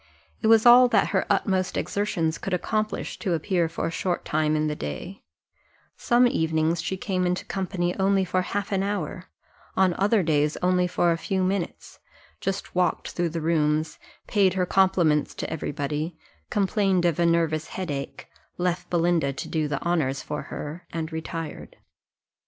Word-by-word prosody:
It 220 - +1
was 225 0 +6
all 245 +1 +9
that - - +2
her - - 0
utmost 185 -2 +1
exertions 170 -6 -1
could 195 - -1
accomplish, 215 +4 -2
to 190 -6 -1
appear 170 0 0
for 165 - -3
a - - -1
short 175 +1 -2
time 155 0 +1
in 155 0 +1
the 150 -1 -1
day 75 - -6 0.7
some 240 +1 +3
evenings 160 -5 +1
she 190 - -3
came 185 -2 -1
into 180 +1 -1
company 180 -2 -2
only 195 0 +3
for 185 +1 0
half 200 +2 -3
an 195 -1 +1
hour, 195 -2 -3 0.5
on 190 -2 +4
other 205 0 +3
days 150 -2 +1
only 180 0 +3
for 175 -1 +2
a 165 - -1
few 190 +2 -1
minutes, 185 -1 -3 0.4
just 195 0 -3
walked 180 -2 0
through 175 -1 -1
the 165 0 -4
rooms, 155 -1 +1 0.3
paid 195 -4 +2
her 185 -1 +1
compliments 175 -5 +2
to - - -4
every 155 - -3
body, 150 +4 -3 0.3
complained 195 -2 +1
of 170 -2 +1
a 170 - +3
nervous 165 -2 +1
head 185 -4 -4
ache, 140 -1 -6 0.3
left 175 0 -1
Belinda 170 -4 +2
to - - -6
do 155 -2 -1
the 145 -2 -2
honours 155 -6 0
for 150 - -4
her, 165 +4 -7
and 160 -1 -4
retired. 160 0 -6
175 Hz, 170 wpm, -25 LUFS, 160-190 Hz, 0.7 s, all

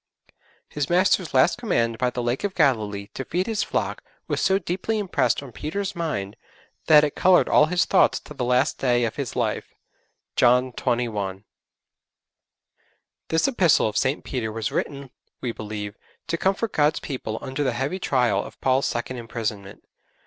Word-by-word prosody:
His 145 -2 -3
Master's 180 -1 +3
last 135 - +3
command 115 - 0
by 125 - +2
the 125 0 -4
Lake 120 +7 -1
of 200 -2 -2
Galilee 105 - +1
to 135 - -4
feed 180 +7 -1
His 220 -1 -1
flock - - -2 0.2
was - - -1
so 190 - +3
deeply 190 +4 -2
impressed 195 -7 0
on 135 - -10
Peter's 195 - -4
mind 105 -13 -3 0.5
that 150 -1 +8
it 145 - 0
coloured 185 -1 +4
all 150 - +5
his 175 +1 +2
thoughts - - +3
to - - -11
the 135 - -4
last 125 +3 +1
day 120 -2 +2
of 115 - -4
his 140 -4 -4
life. - - -2 0.6
(John 125 +1 +4
xxi.) 110 -7 -2 1.8
This 160 +7 +2
Epistle 185 - +3
of 105 - -4
St. 130 +6 0
Peter 120 -5 -3
was 110 0 -3
written, 140 -2 -3 0.3
we 125 - -2
believe, 105 -2 -6 0.3
to - - +1
comfort 195 +5 0
God's 150 0 +2
people 120 -6 -5
under 135 +2 -3
the 130 -3 0
heavy 135 +10 -2
trial 125 -8 +1
of - - -12
Paul's 130 +1 +2
second 120 +2 -3
imprisonment. 110 -4 -5
130 Hz, 165 wpm, -24 LUFS, 115-170 Hz, 1.8 s, that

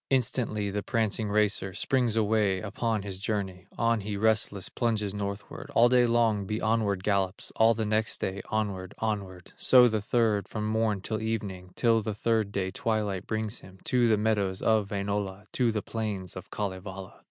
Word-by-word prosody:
Instantly 120 -5 0
the 105 +1 -2
prancing 110 -1 0
racer 100 -2 +1
Springs 125 -1 +1
away 105 -3 +2
upon 110 +2 -2
his 95 -2 -5
journey; 95 -3 -3
On 115 -2 +2
he, 100 0 -4
restless, 105 -2 +1
plunges 110 -4 -1
northward, 100 0 -5
All 120 +1 +6
day 125 -1 +5
long 115 -4 +2
he 105 +1 -1
onward 105 -4 +1
gallops, 100 -2 0
All 115 +1 +5
the 110 0 -1
next 110 +1 +1
day, 95 +1 -3
onward, 100 -3 -2
onward, 100 -5 -4
So 125 -1 +7
the 110 -2 0
third 110 -2 +1
from 105 -1 -4
morn 110 -2 +1
till 110 +2 -3
evening, 100 -5 -4
Till 115 -1 +3
the 105 0 -3
third 110 -1 +1
day 95 -2 -2
twilight 105 -4 -1
brings 110 0 -2
him 95 0 -14
To 125 -2 +2
the 110 -2 +4
meadows 100 -3 0
of 110 -3 +2
Wainola, 100 -1 -3
To 120 -3 +2
the 105 -2 -2
plains 105 -5 -4
of 95 - -8
Kalevala. 95 -1 -5
105 Hz, 175 wpm, -28 LUFS, 100-110 Hz, -, So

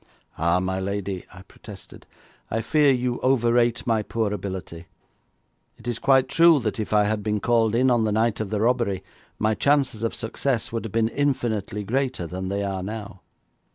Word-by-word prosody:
"' - - -35
'Ah, 85 +2 +2
my 95 +1 -2
lady,' 100 -1 -3
I 95 0 -13
protested, 100 +1 -13 0.4
'I 110 - -1
fear 145 +5 +3
you 125 -1 -1
overrate 120 -2 +2
my 115 -2 +2
poor 110 -1 -2
ability. 95 -4 -6 0.9
It - - -12
is 120 -2 -2
quite 135 -1 +4
true 165 -1 +5
that 110 0 -2
if 110 - -3
I 105 -1 +4
had 105 0 -1
been 105 0 -1
called 115 -1 +2
in 130 +2 +3
on 120 -2 +3
the 105 - 0
night 110 +1 +1
of 110 -2 -3
the 105 0 -1
robbery, 115 -5 +1 0.3
my 110 +1 +1
chances 140 -3 +1
of 115 - -1
success 120 +1 -2
would 115 -1 -3
have 110 - -6
been 115 +1 +1
infinitely 115 -7 -1
greater 130 -3 -1
than 95 +2 -5
they 100 +1 -1
are 95 -1 -3
now.' 100 -1 -7
110 Hz, 190 wpm, -24 LUFS, 100-120 Hz, 0.9 s, true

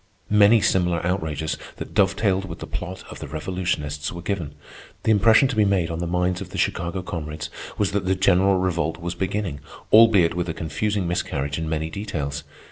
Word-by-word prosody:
Many 105 +2 +6
similar 90 -3 +1
outrages, 80 -4 -1 0.2
that - - -8
dovetailed 95 -1 +2
with 85 -3 -7
the - - -7
plot 95 +2 -6
of - - -9
the - - -6
revolutionists, 75 -2 -3
were 85 -1 -8
given. 85 -7 -3 0.5
The 110 - +3
impression 110 +5 +5
to 130 - -2
be 110 - +4
made 95 -5 +1
on 80 - -3
the 85 - -2
minds 90 +1 0
of - - -7
the - - -7
Chicago 85 +2 -1
comrades 75 -3 -5 0.3
was 100 -3 +1
that 100 -2 -1
the 95 - +3
general 95 0 +4
Revolt 85 -3 0
was 85 +1 -3
beginning, 95 -4 -2 0.3
albeit 110 -6 +7
with 90 0 -2
a 80 - -3
confusing 95 +5 -1
miscarriage 70 -4 -2
in 80 -1 -3
many 80 0 -2
details. 75 -8 -4
90 Hz, 190 wpm, -23 LUFS, 80-100 Hz, 0.5 s, albeit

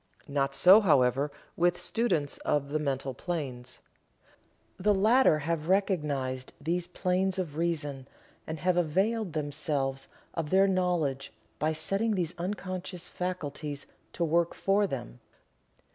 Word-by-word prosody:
Not 140 -1 0
so, 190 +4 +8
however, 140 - +3 0.2
with 175 +1 +2
students 165 -12 0
of 140 -1 0
the 155 +2 0
mental 135 -2 -2
planes. 130 -6 -5 1.0
The 205 +2 +3
latter 220 -2 +5
have 160 +2 -2
recognized 145 -10 0
these 170 +4 -1
planes 185 +1 0
of 170 -6 -3
reason, 145 -5 -2 0.4
and 160 0 -4
have 180 -1 +2
availed 190 +4 +1
themselves 145 -3 -2 0.3
of 160 -3 -3
their 195 +2 +5
knowledge 175 -8 0 0.3
by 155 +2 +1
setting 195 +8 0
these 175 -3 -1
unconscious 185 -1 -4
faculties 150 -5 -4 0.3
to 170 - -1
work 170 +1 +1
for 200 +1 +2
them. 60 - -6
165 Hz, 125 wpm, -29 LUFS, 145-185 Hz, 1.0 s, so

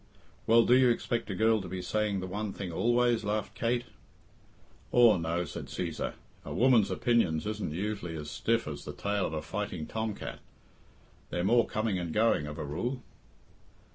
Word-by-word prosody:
"Well, 115 +1 +6
do 125 - +5
you 130 -1 +6
expect 115 -1 -1
a 95 - -2
girl 110 +2 +3
to 95 - -7
be 90 0 -5
saying 105 0 0
the - - -4
one 100 +2 -4
thing 95 -3 -5
always?" 120 +4 +2
laughed 105 +1 -2
Kate. 120 +1 0 1.1
"Aw, 120 -4 +6
no," 85 +1 -1
said - - -7
Cæsar. - - -3 0.3
"A - - -8
woman's 120 -4 +4
opinions 105 -10 +1
isn't 105 -6 -3
usually 95 -1 -3
as 75 -1 -6
stiff 115 +5 0
as 75 -2 -6
the - - -6
tail 100 -1 -1
of - - -6
a 75 - -3
fighting 95 -6 -4
Tom 110 -2 -3
cat. - - -7 0.9
They're 85 - -2
more 120 +5 +4
coming 110 -3 -1
and 85 -2 -4
going, 105 -7 +2
of 75 +1 -7
a 75 - -4
rule." 120 - -3
105 Hz, 180 wpm, -30 LUFS, 90-115 Hz, 1.1 s, Well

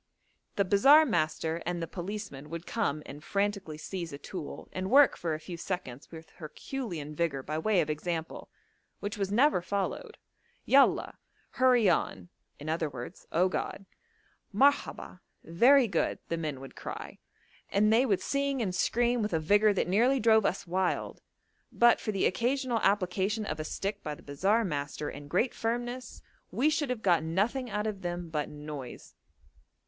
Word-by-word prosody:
The 200 - +2
bazaar 275 +12 +6
master 165 - -1
and 175 0 -2
the 165 - -2
policeman 175 -5 -6
would 170 +1 -6
come 155 -10 -1
and 145 +2 -10
frantically 200 -6 -2
seize 170 +1 -5
a 140 - -6
tool, 165 +1 -7
and 185 0 -3
work 280 +2 +6
for 165 -2 -2
a - - -6
few 170 +2 -8
seconds 170 -8 -5
with 160 -1 -11
herculean 165 - -6
vigour 150 -4 -1
by 155 +3 -3
way 200 +2 +2
of 155 - -3
example, 160 +1 -4 0.5
which 205 +2 -4
was 200 -2 -2
never 255 -1 +4
followed. 200 - -3 0.5
'Yallah!' 275 0 +3 0.3
'hurry 250 -4 +4
on' 175 - 0 0.3
(i.e. 150 -4 -3 0.2
Oh 180 +3 +3
God); 195 +1 -4 0.7
'Marhabbah!' 270 -4 +1 0.2
'very 245 - +5
good,' 175 -6 0
the 165 - 0
men 155 -5 -4
would 135 - -11
cry, - - -7 0.5
and 215 +2 +3
they 235 +3 +5
would 205 -8 +1
sing 280 -1 -1
and 200 -6 -1
scream 240 +5 +1
with 210 -3 -2
a 160 - +2
vigour 205 +7 +4
that 195 - 0
nearly 240 +9 +3
drove 220 -2 +4
us 190 - -3
wild. 180 +1 -1 0.5
But 240 0 +5
for 215 - -2
the 195 - 0
occasional 245 +3 0
application 200 +2 +1
of 150 -4 -4
a - - -2
stick 200 +6 -4
by 150 -1 -4
the - - -17
bazaar 195 +11 +1
master 145 -3 -3
and 145 0 -9
great 225 - +1
firmness, 240 +2 -4 0.3
we 295 +5 +2
should 295 -3 0
have 250 -3 -3
got 175 -4 +4
nothing 210 +11 -1
out 210 0 -2
of 210 -3 -3
them 175 -1 -4
but 150 -2 -2
noise. 150 -4 -8
190 Hz, 165 wpm, -29 LUFS, 160-230 Hz, 0.7 s, bazaar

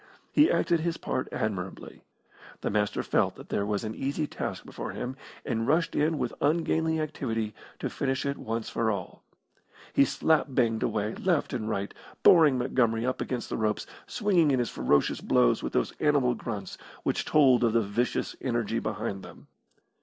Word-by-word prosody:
He 300 +3 +5
acted 170 -2 +2
his 165 +1 -1
part 130 - -2
admirably. 95 -3 -4 0.6
The - - -1
Master 105 0 0
felt - - +1
that - - -12
there 100 - -1
was 105 0 -1
an 110 0 -3
easy 140 +5 -2
task - - -5
before - - -6
him, 125 +1 -4 0.3
and 115 +1 -1
rushed 160 +3 +2
in 155 +1 +2
with 125 - -2
ungainly 160 +1 +1
activity 115 -8 -2 0.2
to - - -3
finish 135 0 -2
it 140 0 -2
once 115 0 -3
for 115 -1 0
all. 100 -4 -4 0.7
He - - +6
slap 155 +4 +2
banged 115 -4 +1
away 110 -1 -1
left 175 -7 0
and 110 -3 -2
right, 100 -2 -2 0.3
boring 155 -6 +7
Montgomery 120 -2 +1
up 130 0 -1
against 125 -2 -3
the - - -1
ropes, 110 -2 0 0.2
swinging 190 -8 +2
in 135 - +3
his 120 -1 -1
ferocious 70 -1 +1
blows - - +3
with - - -4
those - - +1
animal 145 -5 +3
grunts 105 -6 -6 0.2
which - - 0
told 130 -5 +4
of 115 -2 +3
the 115 - +4
vicious 105 +5 -1
energy 115 -3 -1
behind 110 -3 -3
them. - - -13
120 Hz, 175 wpm, -28 LUFS, 110-150 Hz, 0.7 s, boring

